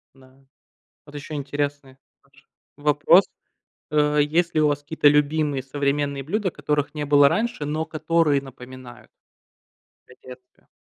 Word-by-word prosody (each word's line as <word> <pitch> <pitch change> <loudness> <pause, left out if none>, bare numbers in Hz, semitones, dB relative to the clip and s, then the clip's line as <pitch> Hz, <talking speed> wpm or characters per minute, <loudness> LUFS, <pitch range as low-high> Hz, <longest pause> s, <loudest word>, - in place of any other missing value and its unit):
Да. 135 0 -22 0.6
Вот 145 - -15
еще 145 +1 -8
интересный 145 -1 -4 0.3
ваш 135 0 -27 0.3
вопрос. 150 +5 +4 0.7
Э, 150 0 +2
есть 165 +4 0
ли 155 - +3
у 150 - +4
вас 145 -1 -1
какие-то 150 0 +1
любимые 145 -1 +1
современные 140 +1 -2
блюда, 195 +5 -2
которых 145 -1 -2
не 150 -1 -4
было 145 -1 +5
раньше, 225 -7 -2
но 155 +2 -2
которые 155 -2 0
напоминают 130 -2 -13 1.0
о - - -16
детстве. 125 0 -15
145 Hz, 135 wpm, -23 LUFS, 140-150 Hz, 1.0 s, было